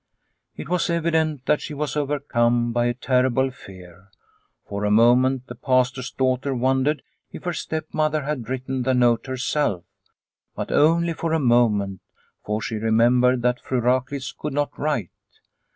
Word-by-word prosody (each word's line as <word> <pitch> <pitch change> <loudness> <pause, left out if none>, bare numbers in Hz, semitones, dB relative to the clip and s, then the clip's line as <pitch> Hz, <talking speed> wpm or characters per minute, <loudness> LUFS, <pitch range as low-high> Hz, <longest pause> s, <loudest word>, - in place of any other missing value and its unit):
It - - -7
was 180 +1 0
evident 160 -4 0
that 150 - +2
she 150 - -6
was 150 +1 -3
overcome 120 -5 0
by 120 0 +1
a 120 - -1
terrible 130 +1 +1
fear. 95 -5 -14 0.6
For 100 0 -4
a 105 - +1
moment 125 +4 +4
the - - -8
Pastor's 130 -1 0
daughter 130 +1 -1
wondered 130 +4 +1 0.3
if - - -10
her 175 -1 -2
stepmother 155 -1 -2
had 135 -6 -4
written 130 0 -3
the 130 +1 +1
note 120 -1 +2
herself, 130 - -1 0.7
but - - -4
only 165 +3 +3
for 165 0 -2
a 160 - +2
moment, 110 - +2 0.4
for 105 +1 -3
she 110 - -3
remembered 120 +3 +3
that 125 0 +1
Fru 130 - -1
Raklitz 130 +3 -1
could 150 -2 -5
not 145 +1 0
write. 145 - -2
130 Hz, 150 wpm, -23 LUFS, 120-145 Hz, 0.7 s, moment